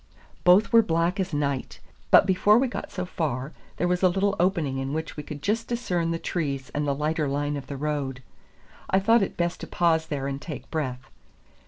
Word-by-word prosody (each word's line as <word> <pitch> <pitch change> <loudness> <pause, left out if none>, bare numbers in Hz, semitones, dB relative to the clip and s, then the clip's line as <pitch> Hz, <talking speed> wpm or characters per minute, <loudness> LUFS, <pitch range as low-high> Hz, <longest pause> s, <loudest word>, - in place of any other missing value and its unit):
Both 190 +6 +5
were 230 - +8
black 170 0 0
as 190 - -1
night; 140 -3 -2 0.3
but - - +7
before 200 +3 +4
we 265 +2 +3
got 245 - -6
so 180 - -3
far, 145 -5 -3 0.2
there 175 - +1
was 180 0 0
a 185 - +5
little 195 +2 +1
opening 165 -7 +1
in 135 +1 -3
which 160 +1 -4
we 150 - -5
could 145 -1 -9
just 225 +3 0
discern 180 -9 -1
the 165 - 0
trees 140 -6 -3
and 145 0 -1
the 140 - +1
lighter 155 +1 0
line 145 +1 -1
of 140 -2 -6
the 140 - -5
road. 140 -3 -3 0.7
I 190 - +4
thought 225 +4 +4
it 195 - -2
best 175 0 -1
to - - -7
pause 160 -2 +1
there 140 -2 -3
and 140 0 -3
take 155 -4 -8
breath. 130 -6 -3
160 Hz, 210 wpm, -26 LUFS, 140-185 Hz, 0.7 s, were